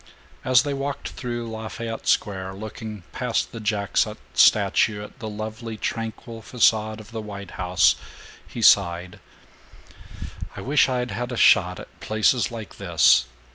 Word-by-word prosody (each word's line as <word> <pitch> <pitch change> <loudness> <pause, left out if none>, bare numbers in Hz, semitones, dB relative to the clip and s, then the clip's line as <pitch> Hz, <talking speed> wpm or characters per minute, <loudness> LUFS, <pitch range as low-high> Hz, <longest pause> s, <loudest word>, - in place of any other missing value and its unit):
As 130 -1 +4
they 145 - -2
walked 140 0 -4
through 120 -2 -5
Lafayette 115 0 -6
Square, 95 -2 0
looking 110 -1 -8
past 125 -2 -1
the 115 - -7
Jackson 105 -2 0 0.2
statue 105 -1 +4
at 105 - -13
the 110 -4 -5
lovely 110 +1 -6
tranquil 115 +1 -5
facade 110 -2 +2
of 110 +1 -13
the 110 -1 -5
White 100 -2 -8
House, 90 -1 +3 0.5
he 115 - -6
sighed, 90 -3 +4 1.4
"I - - -6
wish 140 +1 +3
I'd 125 -2 -1
had 120 +5 -4
a 120 - -4
shot 90 -6 +4
at - - -13
places 110 +3 +1
like 115 -3 -9
this. 70 -9 +4
110 Hz, 140 wpm, -24 LUFS, 100-120 Hz, 1.4 s, As